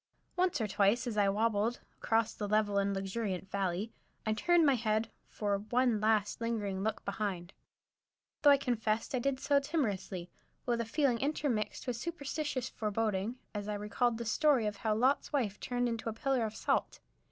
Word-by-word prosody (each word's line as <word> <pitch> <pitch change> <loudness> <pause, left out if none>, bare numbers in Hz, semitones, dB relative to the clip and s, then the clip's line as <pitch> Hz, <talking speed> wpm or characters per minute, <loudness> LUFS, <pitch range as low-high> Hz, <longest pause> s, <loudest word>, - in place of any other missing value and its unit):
Once 360 -3 +1
or 220 - 0
twice, 205 +4 +2
as 235 -3 -3
I 205 -1 +3
wabbled 220 +2 +1 0.2
across 225 0 +1
the 205 - -4
level 205 -1 +2
and 200 0 +1
luxuriant 195 -1 -3
valley, 195 +2 -1 0.3
I 220 - +2
turned 340 +9 +4
my 280 - +5
head 220 -2 0 0.2
for 205 -2 -1
"one 240 +1 +1
last, 215 0 +1
lingering 205 -5 -1
look 220 +2 -2
behind," 195 -3 -3 0.9
though 290 - +7
I 280 - +8
confess 225 -4 -1
I 255 - +1
did 260 +1 0
so 285 +1 +3
timorously, 205 - -2 0.3
with 235 -2 +1
a - - -3
feeling 250 0 +1
intermixed 275 -6 -1
with 250 -2 -2
superstitious 295 -3 -3
foreboding, 215 0 -1 0.2
as 205 -1 -4
I 210 - -2
recalled 225 +3 0
the 235 - -4
story 270 0 +3
of 210 -1 -2
how 215 +1 0
Lot's 255 +5 +2
wife 230 -9 -1
turned 245 0 -1
into 230 -1 -2
a - - -3
pillar 255 +1 0
of 215 - -9
salt. - - 0
225 Hz, 175 wpm, -32 LUFS, 205-250 Hz, 0.9 s, I